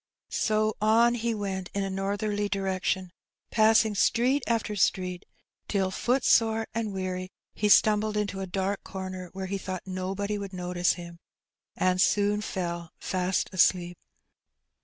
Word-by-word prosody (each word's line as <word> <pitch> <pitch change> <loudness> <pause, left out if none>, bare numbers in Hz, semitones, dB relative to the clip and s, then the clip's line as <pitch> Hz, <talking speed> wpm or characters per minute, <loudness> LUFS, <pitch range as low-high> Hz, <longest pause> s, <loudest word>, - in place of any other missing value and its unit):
So 215 0 +1
on 230 +3 +5
he 235 -1 -1
went 195 -3 -4
in 200 - 0
a 195 - -2
northerly 205 +2 -1
direction, 190 -2 -1 0.4
passing 220 0 +4
street 245 +7 +2
after 225 -2 0
street, 185 -1 0 0.4
till, 190 -2 0
footsore 225 -1 +2
and 220 -2 -2
weary, 185 -1 -4 0.2
he 210 - 0
stumbled 210 0 +4
into 200 -2 -2
a 190 - -4
dark 195 +2 -2
comer 185 -1 -6
where 190 0 -4
he 195 +1 -3
thought 185 -1 -5
nobody 195 +2 -3
would 200 -1 -6
notice 180 0 0
him, 170 -1 -10 0.6
and 185 0 +2
soon 205 +1 +2
fell 170 -4 -4
fast 185 0 -1
asleep. 175 -1 +3
195 Hz, 135 wpm, -27 LUFS, 185-215 Hz, 0.6 s, on